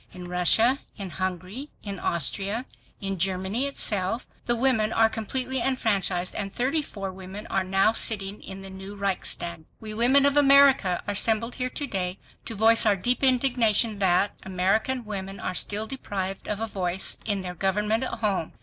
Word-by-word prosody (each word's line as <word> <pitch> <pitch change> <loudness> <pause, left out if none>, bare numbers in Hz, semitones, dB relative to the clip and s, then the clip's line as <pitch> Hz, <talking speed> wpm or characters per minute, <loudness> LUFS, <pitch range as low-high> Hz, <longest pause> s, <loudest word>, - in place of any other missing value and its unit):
In 180 -1 -9
Russia, 180 - +3 0.2
in 195 -4 -6
Hungary, 185 - -4
in 200 -3 -5
Austria, 195 - -1 0.4
in 195 -2 -2
Germany 190 +8 0
itself, 215 -4 0 0.2
the 240 - +4
women 230 -3 +2
are 225 0 +4
completely 250 +4 -3
enfranchised, 200 -8 0
and 195 -1 -3
thirty 270 +8 0
four 195 -8 -6
women 190 +3 -9
are 190 - +1
now 195 +3 +3
sitting 205 -3 -1
in 195 0 -9
the 195 - -8
new 190 +2 -9
Reichstag. 180 -4 -2 0.2
We 215 -1 -8
women 255 +5 +4
of 285 0 +3
America 275 -10 +5
are - - 0
assembled 225 +3 +3
here 255 -1 -2
to 285 - -2
day 185 -6 -3 0.3
to 225 - -5
voice 225 +2 +5
our 205 - +4
deep 245 +8 -1
indignation 240 -5 +3
that... 190 +1 +3
American 195 +7 0
women 195 -2 -6
are - - -3
still 210 +4 -1
deprived 195 -7 -4
of 210 -1 -2
a 225 - -1
voice 190 -3 -2
in 205 -3 -1
their 180 -1 -5
government 210 +6 0
at 235 - -5
home. 195 -7 -1
205 Hz, 170 wpm, -25 LUFS, 190-235 Hz, 0.4 s, America